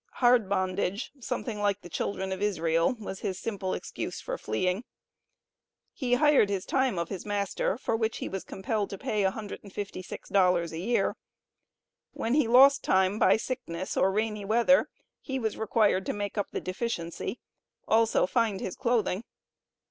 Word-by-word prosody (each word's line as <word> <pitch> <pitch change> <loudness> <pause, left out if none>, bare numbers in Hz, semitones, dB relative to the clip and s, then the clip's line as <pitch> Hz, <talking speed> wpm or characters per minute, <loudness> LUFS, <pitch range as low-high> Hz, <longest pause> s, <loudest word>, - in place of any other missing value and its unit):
Hard 240 -5 +4
bondage 190 +2 -1
something 215 -2 -4
like 205 -1 +1
the - - -10
children 190 +2 -3
of 190 +1 -3
Israel," 165 +1 +1
was 195 -3 -6
his 185 - -3
simple 195 -4 -3
excuse - - -5
for - - -4
fleeing. 185 - -1 1.1
He 245 -3 +1
hired 290 -6 +4
his 195 -2 -2
time 260 -7 +1
of 170 0 -2
his 190 - -5
master, 200 -1 -1
for 230 - -1
which 225 0 -1
he - - -4
was 190 -1 -4
compelled 205 +1 -2
to 195 - -6
pay 210 +2 -1
$156 190 -3 -1
a 160 - -6
year. 230 +7 +1 1.0
When 230 - -1
he 290 -4 +3
lost 270 +4 +7
time 190 +2 +2
by - - +5
sickness 220 -8 -4
or 190 - +3
rainy 210 0 -1
weather, 235 +6 +4 0.3
he 265 -2 -3
was 225 -4 -1
required 210 -3 +2
to - - 0
make 205 -1 -4
up 205 -2 -1
the - - -4
deficiency, 185 0 -4 0.5
also 225 0 +3
find 220 -1 +1
his 185 - -4
clothing. 230 -5 0
205 Hz, 155 wpm, -28 LUFS, 190-230 Hz, 1.1 s, lost